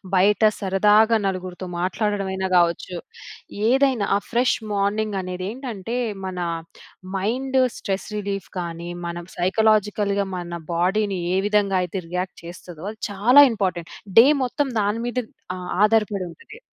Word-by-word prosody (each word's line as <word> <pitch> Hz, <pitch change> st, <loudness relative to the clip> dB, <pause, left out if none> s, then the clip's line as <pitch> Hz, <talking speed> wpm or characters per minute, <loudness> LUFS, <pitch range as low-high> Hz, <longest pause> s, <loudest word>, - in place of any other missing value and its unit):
బయట 200 Hz, +3 st, +4 dB, 0.2 s
సరదాగా 210 Hz, +4 st, +4 dB
నలుగురితో 185 Hz, -1 st, -4 dB
మాట్లాడడమైనా 190 Hz, 0 st, -1 dB
కావచ్చు. 175 Hz, +1 st, +1 dB, 0.7 s
ఏదైనా 260 Hz, -5 st, +3 dB
ఆ -, -, -2 dB
ఫ్రెష్ 245 Hz, +2 st, +2 dB, 0.2 s
మార్నింగ్ 205 Hz, +1 st, 0 dB
అనేదేంటంటే, 200 Hz, +5 st, -5 dB, 0.3 s
మన 185 Hz, -1 st, -5 dB, 0.8 s
మైండ్ 260 Hz, +7 st, 0 dB, 0.2 s
స్ట్రెస్ 195 Hz, 0 st, -3 dB
రిలీఫ్‌గాని, 180 Hz, -4 st, -5 dB, 0.2 s
మన 170 Hz, -, -4 dB, 0.2 s
సైకలాజికల్‌గా 205 Hz, +1 st, +2 dB
మన 175 Hz, -1 st, -6 dB
బాడీ‌ని 190 Hz, +3 st, +1 dB, 0.2 s
ఏ -, -, +2 dB
విధంగా 205 Hz, -2 st, +2 dB
అయితే 180 Hz, +2 st, -4 dB
రియాక్ట్ 180 Hz, +1 st, -3 dB
చేస్తదో 175 Hz, -1 st, -10 dB
అది 220 Hz, -, -15 dB
చాలా 240 Hz, +8 st, +7 dB
ఇంపార్టెంట్. 180 Hz, -6 st, -2 dB, 0.3 s
డే 240 Hz, -, +8 dB, 0.2 s
మొత్తం 270 Hz, +3 st, -1 dB
దాని 205 Hz, +3 st, 0 dB
మీద 245 Hz, -, -5 dB, 0.4 s
ఆహ్, 180 Hz, -1 st, -7 dB
ఆధారపడి 210 Hz, -3 st, +2 dB
ఉంటది. 440 Hz, -, -14 dB
200 Hz, 120 wpm, -23 LUFS, 185-215 Hz, 0.8 s, డే